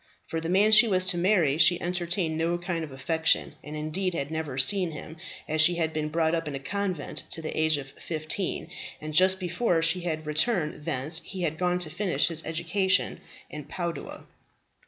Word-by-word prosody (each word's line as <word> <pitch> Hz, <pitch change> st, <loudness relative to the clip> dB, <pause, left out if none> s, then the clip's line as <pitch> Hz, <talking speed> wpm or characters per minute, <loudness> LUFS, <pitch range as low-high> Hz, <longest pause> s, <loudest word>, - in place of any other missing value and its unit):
For 165 Hz, -, -3 dB
the 165 Hz, -, -3 dB
man 200 Hz, +4 st, +4 dB
she 220 Hz, +2 st, +8 dB
was 185 Hz, -3 st, +2 dB
to 180 Hz, -, -1 dB
marry 170 Hz, -6 st, +3 dB
she 170 Hz, +2 st, +6 dB
entertained 175 Hz, -1 st, -1 dB
no 165 Hz, +2 st, 0 dB
kind 175 Hz, -1 st, -3 dB
of 150 Hz, -, -7 dB
affection, 160 Hz, +5 st, +1 dB
and 150 Hz, +1 st, -7 dB
indeed 170 Hz, +4 st, -2 dB
had 140 Hz, -1 st, -3 dB
never 160 Hz, -5 st, -3 dB
seen 180 Hz, +7 st, +3 dB
him, 155 Hz, +2 st, -9 dB, 0.3 s
as 155 Hz, 0 st, +2 dB
she 175 Hz, +2 st, +5 dB
had 160 Hz, -2 st, -1 dB
been 155 Hz, -1 st, -2 dB
brought 160 Hz, +1 st, +1 dB
up 165 Hz, -1 st, -1 dB
in 145 Hz, -, -4 dB
a -, -, -3 dB
convent 185 Hz, +1 st, -3 dB
to -, -, -4 dB
the 155 Hz, -, -5 dB
age 155 Hz, -1 st, +3 dB
of 135 Hz, -1 st, -7 dB
fifteen; 160 Hz, +2 st, -4 dB, 0.3 s
and 155 Hz, 0 st, -6 dB
just 185 Hz, +4 st, +4 dB
before 175 Hz, -1 st, +1 dB
she 165 Hz, +2 st, +2 dB
had 155 Hz, -3 st, -3 dB
returned 150 Hz, -1 st, 0 dB
thence, 150 Hz, +6 st, -2 dB
he 190 Hz, -2 st, -7 dB
had 160 Hz, -2 st, -1 dB
gone 180 Hz, 0 st, +2 dB
to 175 Hz, -4 st, -2 dB
finish 185 Hz, +1 st, +1 dB
his 165 Hz, -1 st, -3 dB
education 180 Hz, +4 st, +1 dB, 0.3 s
at 150 Hz, -2 st, -7 dB
Padua. 170 Hz, -2 st, -5 dB
165 Hz, 200 wpm, -27 LUFS, 155-180 Hz, 0.3 s, she